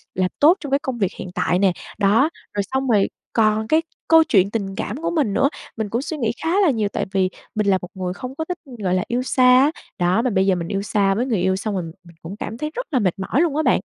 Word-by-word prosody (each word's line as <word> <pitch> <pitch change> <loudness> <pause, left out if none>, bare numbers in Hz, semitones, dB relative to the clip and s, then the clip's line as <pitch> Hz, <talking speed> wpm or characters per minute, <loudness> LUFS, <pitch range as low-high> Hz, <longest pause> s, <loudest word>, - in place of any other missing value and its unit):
làm 185 0 +1
tốt 325 +6 +6
trong 290 -5 -7
cái 275 - +3
công 260 -4 -4
việc 195 -4 0
hiện 185 - -6
tại?" 180 - +1
nè. 195 -1 +4 0.3
Đó, 215 +9 +3 0.2
rồi 205 - 0
xong 265 0 0
rồi 205 -4 +3 0.2
còn 220 -1 +2
cái 315 +4 +3 0.3
câu 325 0 +7
chuyện 200 -9 +3
tình 195 -4 -3
cảm 210 +6 -4
của 335 - -1
mình 285 - 0
nữa, 275 - +3 0.3
mình 220 -2 -2
cũng 235 +4 -1
suy 310 +2 -5
nghĩ 230 -5 0
khá 325 - 0
là 370 - +4
nhiều, 220 -6 +1
tại - - -1
vì 190 -2 +1 0.3
mình 210 -1 0
là 190 - +4
một 180 - -6
người 185 -2 -3
không 255 +5 -7
có 320 - -3
thích, 360 +1 -4 0.3
gọi 180 -1 +1
là, 185 - +1
yêu 245 +1 -1
xa 255 0 +5
á, 290 - +3 0.3
đó, 180 +5 +2
mà 250 - 0
bây 190 -2 +2
giờ 190 -2 +3
mình 170 -1 -4
yêu 195 -1 -2
xa 200 -1 +1
với 235 +5 0
người 230 -7 0
yêu, 190 +1 +2
xong 205 +2 -3
rồi 185 - -2 0.2
mình 170 -1 -17
cũng 175 +5 -7
cảm 225 - -5
thấy 300 +4 -4
rất - - -4
là 255 - +3
mệt 190 -2 0
mỏi 225 - 0
luôn 320 -4 +1
á 310 - +1
bạn. - - +3
215 Hz, 285 wpm, -21 LUFS, 195-270 Hz, 0.3 s, câu